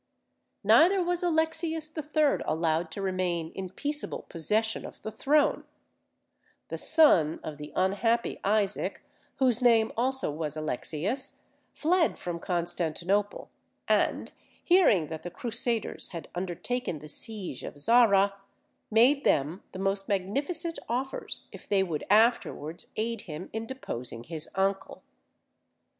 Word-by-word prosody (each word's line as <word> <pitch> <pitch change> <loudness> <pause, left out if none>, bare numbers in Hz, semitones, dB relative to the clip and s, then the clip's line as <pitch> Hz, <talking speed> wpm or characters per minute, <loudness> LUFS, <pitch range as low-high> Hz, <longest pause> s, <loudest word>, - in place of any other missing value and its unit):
Neither 365 +3 +5
was 350 0 0
Alexius 320 -2 0
III. 305 -1 +1
allowed 160 +1 0
to 195 +5 -5
remain 180 -3 -1
in 190 -1 -6
peaceable 295 +9 -3
possession 215 +7 0
of - - -11
the 220 - -4
throne; 285 +7 +2 1.1
the - - -4
son 185 - +5
of 150 -2 -6
the 150 0 -8
unhappy 210 +5 +1
Isaac, 200 0 0 0.3
whose 255 -3 +2
name 230 -3 +4
also 260 - 0
was 155 0 -4
Alexius, 155 - -3 0.4
fled 335 +1 +2
from 175 -1 -5
Constantinople, 175 +3 -1 0.4
and - - +1 0.3
hearing 345 - +5
that 160 -1 -6
the 175 - -6
Crusaders 235 -1 0
had 170 - -7
undertaken 185 +4 -3
the 150 +1 -11
siege 190 - -4
of - - -7
Zara, 200 +2 +4 0.6
made 250 +6 +4
them 150 +6 +1
the - - -8
most 195 +1 -1
magnificent 280 - -1
offers 260 +3 -3
if - - -13
they 195 -2 +3
would 165 -5 -3
afterwards 210 -7 +2
aid 225 0 -2
him 155 +4 -7
in 225 +1 -4
deposing 125 - -5
his 160 +2 -5
uncle. 195 0 -1
205 Hz, 125 wpm, -28 LUFS, 170-265 Hz, 1.1 s, Neither